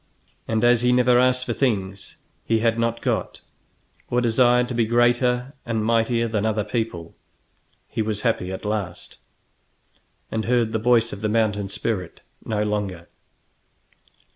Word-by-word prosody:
And 110 0 0
as 120 -1 +4
he 125 0 +3
never 125 0 +4
asked 125 0 +2
for 120 - -2
things 100 -7 -2 0.3
he 115 - +1
had 115 +1 +1
not 115 0 -1
got, - - -2 0.7
or 125 - +1
desired 125 +1 +3
to - - -3
be 115 -2 +1
greater 120 +2 +2
and 110 -2 -2
mightier 115 +1 +1
than 110 -2 -1
other 110 -1 0
people, 105 -6 -4 0.7
he - - -3
was 105 -1 -2
happy 110 -6 -1
at 95 - -6
last, 105 -5 -4 1.1
and 110 -1 -2
heard 120 -2 +1
the 110 - 0
voice 115 0 +2
of 100 - -8
the 110 - 0
mountain 105 -2 0
spirit 95 -2 -4 0.2
no 105 -2 -1
longer. 100 -5 -3
115 Hz, 150 wpm, -23 LUFS, 105-120 Hz, 1.1 s, as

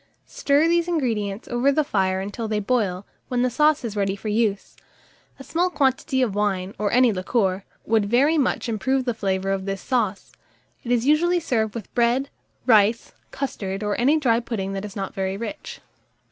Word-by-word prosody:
Stir 290 +3 +2
these 340 0 +2
ingredients 225 - -2
over 245 +3 +2
the 305 +2 +2
fire 190 -8 0
until 205 +4 -5
they 215 -1 -1
boil, 200 -4 -1 0.2
when 245 -1 0
the 250 - +1
sauce 300 +1 +2
is 215 -3 -4
ready 195 -1 0
for 215 +2 -6
use. 210 -2 -1 0.6
A 270 - -10
small 350 +6 0
quantity 265 -4 +1
of 225 -6 -1
wine, 195 -2 -1
or 205 -1 0
any 250 -2 +4
liqueur, 190 0 -1 0.2
would 220 -2 +2
very 260 +9 +3
much 280 -4 0
improve 260 +4 0
the 245 - 0
flavour 195 -3 -1
of 195 -1 -2
this 195 -1 -3
sauce: 215 -6 -2 0.5
it 240 - -4
is 240 -1 +2
usually 345 +5 +3
served 225 -9 -1
with 225 -4 -8
bread, 245 +3 +1 0.3
rice, 220 -1 +3 0.2
custard, 195 -7 -4
or 210 -1 -1
any 285 +6 +4
dry 235 -6 +2
pudding 205 -5 -4
that 195 +1 -4
is 205 - -9
not 195 -2 -4
very 190 0 -2
rich. 235 +8 -7
230 Hz, 185 wpm, -23 LUFS, 200-265 Hz, 0.6 s, any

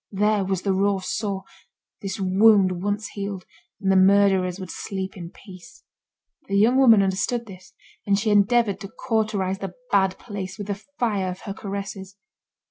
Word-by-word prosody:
There 210 0 +1
was 190 -1 -2
the 195 - +1
raw 200 +1 +2
sore; 195 +1 -3 0.6
this 195 -1 -5
wound 190 -1 +4
once 205 +2 -2
healed, 200 -2 -6 0.3
and 195 -1 +1
the - - +3
murderers 190 -1 +4
would 185 -3 -7
sleep 190 -1 -5
in 170 -3 -8
peace. 180 -4 -15 0.6
The 200 - 0
young 230 +6 +4
woman 230 -7 +6
understood 195 +5 -1
this, 185 -3 -13 0.3
and 200 0 +3
she 215 +1 0
endeavoured 205 0 +3
to 195 - -7
cauterise 210 -5 -1
the 195 -2 -6 0.2
bad 190 -2 +2
place 195 -4 -7
with 205 - -5
the 205 +1 -5
fire 210 -8 0
of 185 +1 -7
her 200 - -6
caresses. 195 -1 -6
195 Hz, 165 wpm, -23 LUFS, 190-205 Hz, 0.6 s, woman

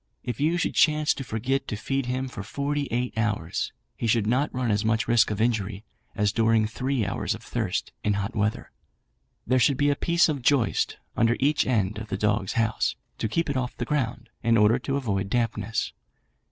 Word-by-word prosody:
If 120 - -4
you 160 +4 +2
should - - 0
chance 150 -1 +4
to 135 - -6
forget 125 +4 -1
to - - -3
feed 135 +4 -2
him 130 +1 -1
for 125 - -7
forty 140 +6 -2
eight 120 +2 -1
hours, 110 -7 -1 0.2
he 115 - -2
would 110 -3 0
not 130 +7 +1
run 125 -3 -1
as 105 +1 +1
much 110 +1 +1
risk 120 -1 +4
of 105 -1 -3
injury, 110 -3 0 0.3
as 105 0 +2
during 110 0 +3
three 125 +1 -1
hours 100 - -1
of - - -12
thirst - - -2
in 105 - +2
hot 100 +4 -3
weather. 105 0 -1 0.7
There 130 +2 +3
should 135 +2 +3
be 145 +1 +3
a - - +1
piece 170 +3 +3
of 145 -4 -2
joist 130 -1 +2 0.2
under 115 +1 +3
each 145 +2 +2
end 105 -5 +1
of 110 - -7
the - - -3
dog 105 -2 +1
house, 110 -1 0 0.2
to 110 - -1
keep 165 +9 0
it 140 - -2
off 125 -1 -3
the 120 - -2
ground, 120 -4 -2
in 115 0 +3
order 105 +3 +4
to 135 +2 -2
avoid 100 -7 -1
dampness. 115 -2 -1
115 Hz, 205 wpm, -26 LUFS, 110-135 Hz, 0.7 s, chance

